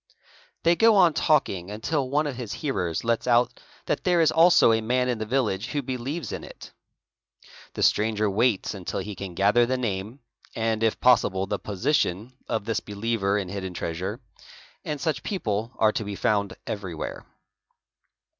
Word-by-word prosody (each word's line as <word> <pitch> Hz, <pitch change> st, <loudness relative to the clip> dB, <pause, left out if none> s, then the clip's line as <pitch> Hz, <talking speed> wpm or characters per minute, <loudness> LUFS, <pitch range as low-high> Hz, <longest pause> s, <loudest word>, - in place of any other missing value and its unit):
They 170 Hz, +1 st, +4 dB
go 225 Hz, +3 st, +5 dB
on 180 Hz, -5 st, +5 dB
talking 95 Hz, -, +1 dB
until 130 Hz, +6 st, -2 dB
one 150 Hz, +3 st, +1 dB
a 145 Hz, -, -1 dB
of -, -, -9 dB
his 120 Hz, -4 st, -5 dB
hearers 95 Hz, -, -2 dB
lets 115 Hz, +1 st, 0 dB
out 120 Hz, 0 st, +3 dB, 0.3 s
that -, -, -1 dB
there 180 Hz, -1 st, +3 dB
is 160 Hz, -, +4 dB
also 165 Hz, -7 st, +6 dB
a 110 Hz, 0 st, +2 dB
man 125 Hz, +3 st, +1 dB
in 125 Hz, -3 st, -1 dB
the 110 Hz, -, -4 dB
village 115 Hz, -4 st, 0 dB
who 145 Hz, +2 st, -2 dB
believes 130 Hz, +6 st, -4 dB
i -, -, -2 dB
in -, -, -13 dB
it. -, -, -11 dB, 1.0 s
The -, -, -1 dB
stranger 110 Hz, 0 st, +2 dB
waits 110 Hz, +1 st, +1 dB
until 95 Hz, -2 st, -4 dB
he 100 Hz, +2 st, -5 dB
can 95 Hz, -1 st, -7 dB
gather 105 Hz, +5 st, +4 dB
the 130 Hz, +1 st, 0 dB
name, 110 Hz, +2 st, -4 dB, 0.3 s
and 115 Hz, -1 st, -1 dB
if 115 Hz, -1 st, +1 dB
possible 100 Hz, -6 st, +3 dB
he 100 Hz, -, -1 dB
position, 110 Hz, 0 st, -1 dB, 0.2 s
of 110 Hz, -2 st, -1 dB
this 115 Hz, -1 st, 0 dB
believer 105 Hz, -1 st, -1 dB
in 95 Hz, -3 st, -3 dB
hidden 95 Hz, -2 st, -5 dB
treasure—and 100 Hz, -, -7 dB
such 145 Hz, -3 st, -1 dB
people 115 Hz, -, -2 dB
are 110 Hz, -1 st, +4 dB
to 110 Hz, -, -3 dB
¢ 100 Hz, -1 st, -5 dB
found 100 Hz, -2 st, 0 dB
everywhere. 95 Hz, -7 st, -5 dB
110 Hz, 175 wpm, -25 LUFS, 100-130 Hz, 1.0 s, also